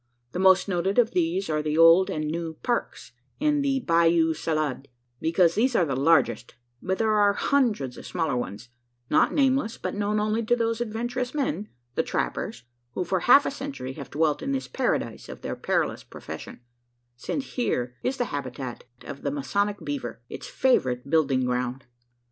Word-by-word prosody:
The 180 - -4
most 190 0 +5
noted 190 +2 0
of 240 -1 +4
these 180 0 0
are 155 -1 0
the 150 0 -1
Old 165 +3 +7
and 155 0 -2
New 165 +1 -3
"Parks," 240 -1 -2 0.3
and 295 0 +2
the 270 -1 +1
"Bayou 165 -3 +3
Salade" 155 -4 -2 0.3
because 165 +1 +3
these 245 +5 +1
are 175 - +4
the 135 -4 -2
largest; 140 -4 +2 0.3
but 190 +1 -1
there 220 -1 +2
are 205 -1 +4
hundreds 210 - 0
of - - -10
smaller 165 -6 -1
ones, 120 0 -5 0.4
not - - +4
nameless, 265 -5 +1
but - - -4
known 205 +1 0
only 215 +2 0
to 235 +2 +2
those 230 -1 -1
adventurous 240 +3 -3
men 275 -7 -2 0.2
the - - +1
trappers 120 - -3 0.3
who 180 - -1
for 185 +2 0
half 275 +9 +6
a - - -1
century 270 - -6
have 140 -2 -9
dwelt 155 0 +1
in 275 +1 -2
this 270 - -2
paradise 240 - -2
of - - -9
their - - -4
perilous - - -1
profession: - - -9 0.5
since 265 - -4
here 125 - -1
is 265 +1 -1
the 245 - 0
habitat 130 -2 -5 0.2
of 140 - -8
the 140 - -1
masonic 200 +9 -1
beaver 290 -1 -4
its - - -7
favourite 135 - +1
building 135 -5 +2
ground. 125 +1 -2
180 Hz, 175 wpm, -26 LUFS, 145-240 Hz, 0.5 s, Old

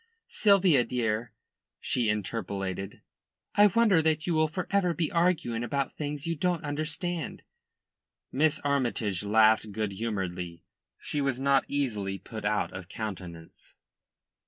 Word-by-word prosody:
"Sylvia, 190 - +4
dear," 115 -1 -1 0.5
she 120 -4 0
interpolated, 100 -2 -3 0.5
"I 205 0 +7
wonder 205 -4 +4
that 155 -1 +1
you 175 - 0
will 155 0 +3
for 175 +3 -4
ever 180 -4 +2
be 165 -3 -1
arguing 170 -10 +1
about 135 +3 -1
things 145 0 -4
you 165 0 -1
don't 175 +1 0
understand." 160 +3 -3 0.9
Miss 150 +3 +2
Armytage 120 -9 0
laughed 110 +1 +4
good 105 0 -2
humouredly. 95 -5 -4 0.4
She 145 - -2
was 135 -2 0
not 135 0 +3
easily 105 -9 -1
put 110 +3 -8
out 105 -1 0
of 95 -1 -8
countenance. 90 -6 -8
125 Hz, 130 wpm, -28 LUFS, 105-160 Hz, 0.9 s, I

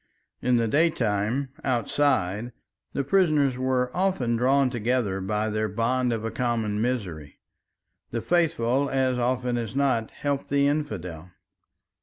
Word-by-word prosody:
In 125 0 +3
the 115 -1 +1
daytime, 125 -3 +1
outside, 120 -4 0 0.4
the 140 - -1
prisoners 150 -5 +3
were 130 0 0
often 180 -11 +1
drawn 130 +2 +3
together 115 -4 0
by 105 +3 -1
their 110 0 -1
bond 120 +4 0
of 110 -1 -2
a 115 - -2
common 115 -3 -1
misery; 90 - -3 0.7
the 115 - -2
faithful 140 -4 +1
as 130 -2 +1
often 125 0 0
as 115 +2 -5
not 130 -5 +1
helped 140 -1 -3
the 140 0 +3
infidel. 90 - -2
125 Hz, 130 wpm, -26 LUFS, 110-140 Hz, 0.7 s, In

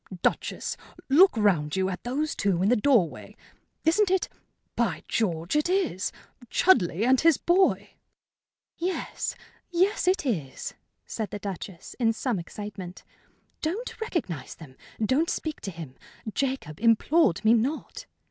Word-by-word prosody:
"Duchess, - - -1 0.3
look 330 +1 +6
round 175 -8 +2
you, 190 0 +1
at 185 -1 -5
those 285 +5 -1
two 185 -3 +1
in 200 - +3
the 245 - +5
doorway. 220 - +1 0.5
Isn't 370 +5 +4
it 380 -1 +1 0.5
by - - 0
George, 170 - -1
it 300 +3 +2
is! 360 - 0 0.4
Chudleigh 205 - +3
and 260 0 +4
his 330 -3 +5
boy!" 370 +2 +2 0.9
"Yes 360 +2 -2 0.3
yes, 365 +2 +1
it 370 -4 +2
is," 160 - -3 0.3
said 220 -2 -4
the - - -5
Duchess, 195 -3 -7
in 225 -2 +3
some 230 -3 -1
excitement. 190 0 -8 0.6
"Don't 425 +9 -3
recognize 265 - -3
them. 140 -6 -13 0.3
Don't 290 +9 +2
speak 315 -2 -3
to 200 - -4
him. 165 -7 -8 0.4
Jacob 260 - -2
implored 230 - +3
me 220 - +7
not." 250 +7 -1
230 Hz, 135 wpm, -27 LUFS, -, 0.9 s, me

